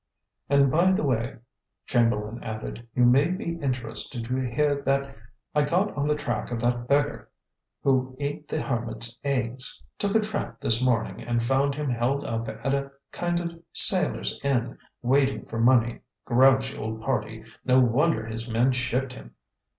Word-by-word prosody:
"And, 140 -1 +4
by 175 +5 +3
the 185 - 0
way," 125 -3 -1 0.5
Chamberlain 115 -2 0
added; 110 +2 -7
"you 125 - +4
may 135 +6 +4
be 175 -3 -4
interested 125 -3 -1
to 125 +2 -2
hear 140 +3 0
that 140 0 +1
accidentally 135 -4 -15 0.3
I 150 - +3
got 180 +8 0
on 145 0 -1
the 150 - +2
track 145 -1 -3
of 120 -1 -3
that 120 0 -1
beggar 145 +2 0 0.5
who 130 -1 +1
ate 145 +1 -4
the 155 - -2
hermit's 115 -2 -3
eggs. 130 -2 +1
Took 200 0 -1
a - - +6
tramp 210 - -4
this 115 +2 +5
morning, 120 -3 0
and 120 0 -1
found 135 +3 +1
him 150 0 -3
held 125 +3 -1
up 115 0 -3
at 135 +2 -3
a 140 0 -2 0.2
kind 175 0 -1
of 170 -1 -6
sailor's - - +5
inn, 125 -3 0 0.3
waiting 135 +2 +1
for 115 - -6
money. 120 -1 +3 0.3
Grouchy 130 +2 +3
old 110 0 -5
party; 110 -3 -3 0.2
no 130 0 +4
wonder 125 +1 +2
his 115 +1 -5
men 120 +3 +2
shipped 125 +1 -2
him." - - -13
130 Hz, 165 wpm, -25 LUFS, 120-140 Hz, 0.5 s, a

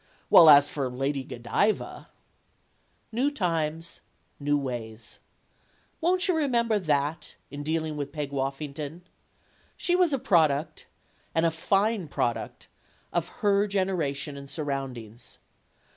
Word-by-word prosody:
While 165 - +9
as 145 -1 +8
for 140 -3 -3
Lady 135 +2 -2
Go 125 - -8
diva 165 - -1 1.0
New 250 +6 +1
times, 165 - -2 0.4
new 145 0 +1
ways. 120 -5 -6 0.8
Won't 365 +3 +2
you 365 - +3
remember 235 -8 +1
that, 150 -2 -1 0.2
in 145 - -6
dealing 155 0 -2
with 145 -1 -4
Peg 145 -2 -4
Woffington? 140 +3 -4 0.8
She 355 - +1
was 360 -3 +3
a 275 - +2
product 155 - +1 0.5
and 165 0 +3
a 165 - +3
fine 195 +4 +1
product 120 -4 -3 0.5
of 175 -1 0 0.2
her 200 0 +4
generation 165 -8 -1
and 140 0 -10
surround 135 -5 -3
ings. 115 +1 -12
155 Hz, 125 wpm, -27 LUFS, 140-195 Hz, 1.0 s, While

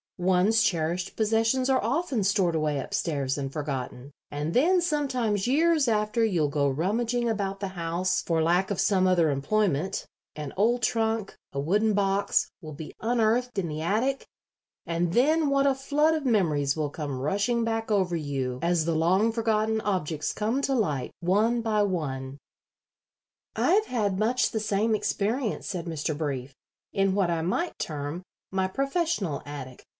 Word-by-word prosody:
"One's 190 +4 +3
cherished 175 -3 0
possessions 225 +4 +1
are 265 -1 +2
often 280 - 0
stored 190 -3 +2
away 155 -3 0
up 130 - -6
stairs 140 -4 -1
and 135 -1 -3
forgotten, 140 -2 -5 0.2
and 150 +3 -3
then 355 +8 +4
sometimes 255 - 0
years 310 +1 +3
after 215 +1 +1
you'll 175 -9 +2
go 140 -1 +1
rummaging 230 - 0
about 200 -3 -2
the 195 -1 -3
house 175 0 -1
for 165 -2 0
lack 175 +4 +2
of 200 - -2
some 185 -2 +3
other 170 -4 +3
employment; 180 +3 0 0.3
an 150 -2 -6
old 240 +4 +2
trunk, 220 -2 0 0.2
a 140 - -2
wooden 205 +9 +2
box, 200 0 +1
will 155 -2 -8
be 155 +1 -8
unearthed 235 +1 +1
in 180 - -2
the 155 0 -4
attic, 230 +10 0 0.6
and 170 0 -1
then 300 +6 +3
what 275 0 +2
a 275 - +4
flood 290 +4 +1
of 310 -2 -2
memories 155 - +2
will 150 -2 -2
come 145 -4 -4
rushing 205 - 0
back 225 0 -2
over 190 -4 +1
you 135 -5 -3
as 170 -2 +1
the 165 -1 0
long 185 +8 +3
forgotten 220 -1 0
objects 160 -7 -2
come 225 +6 -1
to 275 - +1
light, 150 - -1
one 215 +7 +2
by 220 -2 +1
one." 140 -9 -2 1.2
"I - - +2
have 430 +2 +3
had 205 -6 -1
much 235 +4 +2
the 220 - -1
same 215 +1 +1
experience," 215 +3 -1
said 180 -4 -4
Mr. 160 -2 -2
Brief, 140 -4 -4 0.4
"in 195 -1 +2
what 190 -4 +2
I 165 -1 0
might 320 - -1
term 150 +2 -4 0.3
my 190 0 0
professional 275 - -1
attic. 130 -3 -8
195 Hz, 165 wpm, -27 LUFS, 160-230 Hz, 1.2 s, then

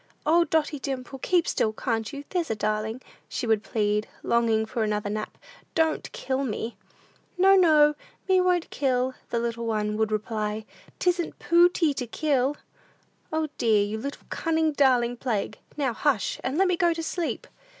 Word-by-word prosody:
"O, 335 +2 +4
Dotty 305 -2 0
Dimple, 265 -1 -5
keep 350 +4 +2
still; 220 - +1
can't 225 -1 -2
you? 280 0 -7
There's 350 -4 -1
a 220 - 0
darling," 215 +3 -2 0.3
she - - -3
would 220 -2 +2
plead, 210 -1 0 0.2
longing 225 -2 +2
for 225 +1 -3
another 210 -1 -1
nap; 215 0 -4 0.4
"don't 320 -1 +1
kill 265 +1 -2
me." 225 -1 -3 0.6
"No, 385 +2 +6
no; 305 -5 +6 0.3
me 375 -1 +4
won't 360 -2 +1
kill," 260 -2 0 0.2
the 235 - -1
little 235 0 -2
one 210 -1 -1
would 220 0 +1
reply; 215 0 -2 0.3
"'tisn't 355 -2 0
pooty 340 -2 +4
to 255 -3 -4
kill!" 280 +1 0 0.7
"O, 315 -1 -1
dear, 215 -3 +3
you 215 +2 -4
little, 280 +5 -6
cunning, 320 -1 +1
darling 250 -4 +3
plague, 230 -5 -2 0.2
now 270 -5 0
hush, 240 -4 0
and 265 +4 -1
let 385 +1 +4
me 365 - +2
go 345 -1 +3
to 330 - -4
sleep!" 340 +1 -3
260 Hz, 165 wpm, -26 LUFS, 220-320 Hz, 0.7 s, No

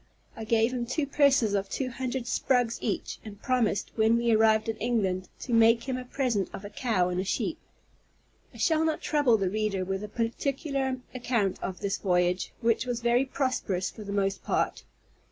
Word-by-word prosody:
I 225 - -6
gave 225 +2 +2
him 240 -2 -2
two 280 +4 0
purses 275 -6 +3
of 195 -1 -1
two 255 -2 -2
hundred 255 0 -3
sprugs 245 -1 +1
each, 215 - -3
and 205 -2 -10
promised, 245 -6 0
when 225 +1 +4
we 235 0 +1
arrived 220 0 +4
in 225 - -1
England, 195 -6 -1
to 245 - -4
make 230 0 +5
him 260 0 -2
a 255 - -4
present 245 -7 -1
of 195 - -7
a 205 - -8
cow 215 -8 +1
and 180 0 -2
a - - -2
sheep. 245 - -2 0.9
I - - -14
shall 320 -2 +2
not 315 -1 0
trouble 290 -7 +3
the 190 -3 -1
reader 210 -3 -1
with 195 +2 -3
a - - -4
particular 265 +4 -1 0.2
account 240 -6 -1
of 185 +1 -5
this 200 -1 -1
voyage, 180 -1 +1
which 230 +2 +1
was 240 -1 -2
very 240 +2 +3
prosperous 255 -9 -1
for 215 - -10
the 200 - -6
most 195 -1 -1
part. - - -1
230 Hz, 190 wpm, -28 LUFS, 200-255 Hz, 0.9 s, make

